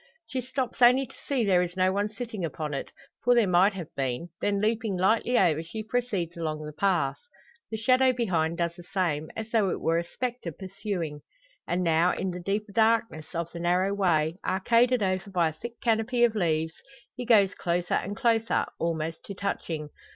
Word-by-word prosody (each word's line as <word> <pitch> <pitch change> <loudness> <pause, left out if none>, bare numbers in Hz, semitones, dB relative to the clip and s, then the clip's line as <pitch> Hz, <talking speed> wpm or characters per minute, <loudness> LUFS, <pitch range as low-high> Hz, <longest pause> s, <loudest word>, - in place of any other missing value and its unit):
She 260 - -3
stops 255 0 -4
only 250 +3 +6
to - - -17
see 265 -5 +1
there 185 -3 +4
is 180 +1 -3
no 185 0 +3
one 205 +1 0
sitting 220 -3 -6
upon 155 -1 -3
it 140 - -4 0.3
for 245 +1 +5
there 235 -3 +5
might 185 +2 +4
have 175 -4 -7
been 135 +5 -2
then 200 -1 +1
leaping 220 -2 0
lightly 220 +6 +2
over, 160 -4 +3
she 215 +7 -6
proceeds 215 -8 -2
along 155 -2 -3
the 150 - -7
path. 170 -5 +1 0.5
The 220 - -3
shadow 255 +4 +4
behind 170 -9 0
does 170 -1 -1
the 175 - -11
same, 170 -4 -1
as 220 0 -6
though 215 -4 +3
it - - -2
were 165 +1 +1
a - - -2
spectre 245 0 -4
pursuing. 190 -4 -4 0.5
And 180 +1 0
now, 165 +1 +3
in 190 0 -2
the 180 - -6
deeper 205 +3 -2
darkness 220 -7 +1
of 170 0 -2
the 170 - -7
narrow 180 +3 +2
way, 165 -4 +1
arcaded 235 +5 +3
over 185 +1 -1
by 175 -4 +2
a - - -8
thick 235 +8 -9
canopy 235 +2 +2
of 235 -2 +4
leaves, 160 -5 0 0.4
he 250 - -5
goes 210 -5 +4
closer 175 0 -1
and 200 +2 -1
closer, 230 -2 +2
almost 165 -1 -2
to 200 - -7
touching. 165 -6 -3
190 Hz, 195 wpm, -27 LUFS, 170-225 Hz, 0.5 s, only